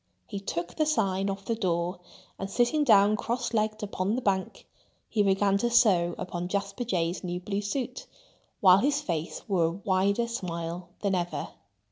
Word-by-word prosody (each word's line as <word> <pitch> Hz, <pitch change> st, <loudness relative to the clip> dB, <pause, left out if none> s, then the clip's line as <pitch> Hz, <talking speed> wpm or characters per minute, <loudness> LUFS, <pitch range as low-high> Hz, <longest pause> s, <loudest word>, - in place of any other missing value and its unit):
He 200 Hz, -, -5 dB
took 175 Hz, -3 st, -4 dB
the 310 Hz, -1 st, +2 dB
sign 195 Hz, -9 st, +1 dB
off 195 Hz, 0 st, -5 dB
the 230 Hz, -, 0 dB
door; 180 Hz, -4 st, -1 dB, 0.4 s
and 195 Hz, -, -4 dB
sitting 245 Hz, +8 st, +2 dB
down 210 Hz, -5 st, +6 dB
cross 235 Hz, +2 st, -2 dB
legged 215 Hz, 0 st, 0 dB
upon 200 Hz, +1 st, -1 dB
the 255 Hz, -, -2 dB
bank, 190 Hz, -2 st, -1 dB, 0.4 s
he 215 Hz, -, +1 dB
began 195 Hz, 0 st, +3 dB
to 240 Hz, -, +1 dB
sew 195 Hz, -8 st, +4 dB
upon 175 Hz, -1 st, -4 dB
Jasper 200 Hz, +4 st, -2 dB
Jay's 180 Hz, -6 st, -1 dB
new 180 Hz, -1 st, -3 dB
blue 200 Hz, +2 st, -3 dB
suit, 245 Hz, +6 st, -4 dB, 0.5 s
while 185 Hz, -1 st, +7 dB
his 285 Hz, +5 st, +2 dB
face 170 Hz, -, -4 dB
wore 185 Hz, -5 st, +2 dB
a 165 Hz, -, +1 dB
wider 200 Hz, +4 st, +1 dB
smile 175 Hz, -5 st, -4 dB
than 200 Hz, -2 st, +1 dB
ever. 175 Hz, -1 st, -2 dB
195 Hz, 170 wpm, -28 LUFS, 180-220 Hz, 0.5 s, while